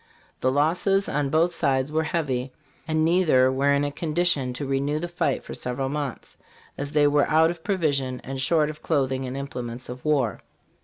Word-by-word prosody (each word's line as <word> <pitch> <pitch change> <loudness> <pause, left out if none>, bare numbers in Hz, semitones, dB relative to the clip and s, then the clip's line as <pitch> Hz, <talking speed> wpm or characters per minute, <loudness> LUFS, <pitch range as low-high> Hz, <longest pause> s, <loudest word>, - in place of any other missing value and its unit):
The 130 - +1
losses 175 +7 +2
on 145 -1 -1
both 165 +4 +2
sides 140 -3 0
were 160 +1 +1
heavy, 135 -6 -2 0.4
and 155 0 +1
neither 160 -7 +4
were 140 +2 +2
in 140 0 +2
a 145 - -1
condition 150 -3 0
to 140 +3 -4
renew 135 +2 0
the 170 +3 -3
fight 170 -5 -1
for - - -8
several 125 +2 -3
months, 145 -3 -5 0.4
as 145 0 -4
they 150 -1 +4
were 145 0 +3
out 160 +1 +4
of 170 -2 -10
provisions 145 -10 0
and 135 0 -5
short 155 +2 +2
of 150 - -15
clothing 135 -4 0
and 130 +1 -5
implements 125 -3 -6
of 125 0 -8
war. 140 -8 +1
145 Hz, 190 wpm, -25 LUFS, 130-160 Hz, 0.4 s, neither